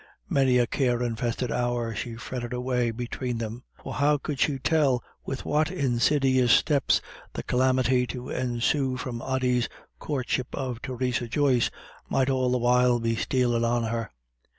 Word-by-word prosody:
Many 130 Hz, -2 st, +4 dB
a 120 Hz, -, +4 dB
care 125 Hz, -1 st, 0 dB
infested 120 Hz, +1 st, -2 dB
hour 120 Hz, -2 st, -1 dB
she 115 Hz, +2 st, -5 dB
fretted 120 Hz, +1 st, -5 dB
away 125 Hz, -1 st, 0 dB
between 120 Hz, +1 st, -4 dB
them. 115 Hz, +1 st, -5 dB, 0.2 s
For -, -, -7 dB
how 145 Hz, +2 st, +3 dB
could 145 Hz, -1 st, -5 dB
she 145 Hz, -3 st, +2 dB
tell 135 Hz, -3 st, +2 dB, 0.2 s
with 135 Hz, -, -4 dB
what 155 Hz, +2 st, +1 dB
insidious 130 Hz, -4 st, +2 dB
steps 145 Hz, +1 st, +3 dB, 0.3 s
the -, -, -4 dB
calamity 130 Hz, 0 st, +2 dB
to 125 Hz, 0 st, -6 dB
ensue 130 Hz, +2 st, 0 dB
from 125 Hz, -2 st, -5 dB
Ody's 125 Hz, -2 st, 0 dB, 0.3 s
courtship 130 Hz, -3 st, -2 dB
of 130 Hz, -3 st, -4 dB
Theresa 125 Hz, -1 st, -2 dB
Joyce 130 Hz, -1 st, +2 dB, 0.4 s
might 135 Hz, 0 st, +2 dB
all 130 Hz, -1 st, +1 dB
the 125 Hz, -, +2 dB
while 125 Hz, 0 st, +3 dB
be 115 Hz, 0 st, 0 dB
stealing 120 Hz, -1 st, +1 dB
on 120 Hz, 0 st, +1 dB
her? 115 Hz, 0 st, -2 dB
125 Hz, 150 wpm, -26 LUFS, 120-130 Hz, 0.4 s, Many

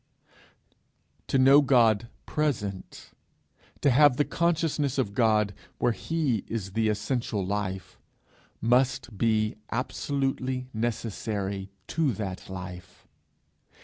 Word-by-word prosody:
To -, -, +1 dB
know 135 Hz, +2 st, +7 dB
God 115 Hz, -5 st, +4 dB, 0.2 s
present, 110 Hz, -11 st, -3 dB, 0.7 s
to 140 Hz, -, +4 dB
have 140 Hz, 0 st, +5 dB
the 145 Hz, -, +3 dB
consciousness 160 Hz, -5 st, 0 dB
of 120 Hz, -7 st, 0 dB
God 105 Hz, -3 st, +2 dB, 0.2 s
where 120 Hz, -, +2 dB
he 140 Hz, -4 st, -1 dB
is 105 Hz, -4 st, -4 dB
the 110 Hz, +2 st, +1 dB
essential 105 Hz, -2 st, -1 dB
life, 95 Hz, -2 st, -4 dB, 0.6 s
must 125 Hz, 0 st, +1 dB
be 110 Hz, 0 st, +1 dB
absolutely 130 Hz, +1 st, -2 dB
necessary 105 Hz, -3 st, -3 dB, 0.2 s
to 155 Hz, -6 st, +1 dB
that 95 Hz, -3 st, -5 dB
life! 90 Hz, -1 st, -9 dB
115 Hz, 100 wpm, -27 LUFS, 100-135 Hz, 0.7 s, know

